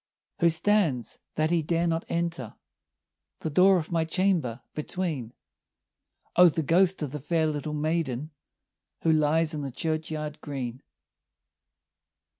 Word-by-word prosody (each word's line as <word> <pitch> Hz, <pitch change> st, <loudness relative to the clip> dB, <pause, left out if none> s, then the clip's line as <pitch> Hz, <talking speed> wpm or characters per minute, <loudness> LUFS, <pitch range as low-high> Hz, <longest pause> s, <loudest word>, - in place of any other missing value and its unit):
"Who 170 Hz, -, +5 dB
stands, 165 Hz, -, +1 dB, 0.2 s
that 155 Hz, +1 st, +1 dB
he 170 Hz, -1 st, +3 dB
dare 165 Hz, +2 st, 0 dB
not 165 Hz, 0 st, 0 dB
enter, 170 Hz, -9 st, -2 dB, 0.9 s
The 160 Hz, -, -3 dB
door 185 Hz, +5 st, +6 dB
of 165 Hz, -1 st, -4 dB
my 165 Hz, -1 st, +2 dB
chamber, 160 Hz, -8 st, 0 dB
between?" 155 Hz, -6 st, -3 dB, 1.0 s
"O, 180 Hz, 0 st, +8 dB
the 160 Hz, 0 st, -2 dB
ghost 180 Hz, +3 st, +3 dB
of 145 Hz, -, -3 dB
the 150 Hz, -, -5 dB
fair 160 Hz, +3 st, +1 dB
little 150 Hz, 0 st, -2 dB
maiden, 155 Hz, -2 st, -1 dB, 0.7 s
Who 165 Hz, -, +4 dB
lies 155 Hz, +1 st, +2 dB
in 150 Hz, -, -3 dB
the 140 Hz, -, -3 dB
churchyard 155 Hz, +1 st, -3 dB
green." 130 Hz, -4 st, -5 dB
160 Hz, 130 wpm, -27 LUFS, 150-170 Hz, 1.0 s, O